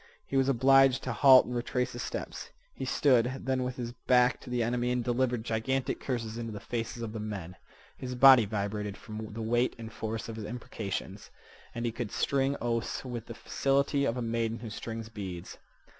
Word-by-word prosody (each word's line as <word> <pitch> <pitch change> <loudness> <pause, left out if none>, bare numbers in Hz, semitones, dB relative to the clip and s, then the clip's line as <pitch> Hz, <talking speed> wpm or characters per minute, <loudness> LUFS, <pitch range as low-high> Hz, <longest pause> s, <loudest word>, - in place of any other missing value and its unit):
He - - -5
was 135 0 +3
obliged 135 +1 +5
to - - -2
halt 135 -2 +7
and 125 - -5
retrace 125 +1 -1
his 120 - -6
steps. - - -5 0.2
He - - -5
stood 130 -2 +2
then 130 -1 0
with 125 0 -3
his 120 -2 -4
back 125 0 +3
to - - -11
the 125 -1 0
enemy 120 +1 0
and 125 -1 0
delivered 125 -1 0
gigantic 130 +4 -1
curses 115 -3 -3
into 115 -1 -4
the 105 - -6
faces 115 +1 -4
of 110 -1 -5
the 110 - -4
men. 100 -5 -5 0.4
His 125 -1 -5
body 130 -2 +8
vibrated 105 0 -3
from 110 -1 -7
the 110 +1 -5
weight 120 +3 +1
and 115 -1 -8
force 110 0 -4
of 115 -1 -6
his 110 - -5
imprecations. 105 -4 -5 0.5
And 120 0 -2
he 120 - 0
could 115 -2 -5
string 135 0 +1
oaths 115 +1 -2
with 120 -3 -5
the 115 - -7
facility 140 +2 +1
of 120 -1 0
a 125 - -2
maiden 115 0 -1
who 115 -1 -8
strings 115 +1 -6
beads. 95 -6 -7
120 Hz, 200 wpm, -30 LUFS, 110-125 Hz, 0.5 s, body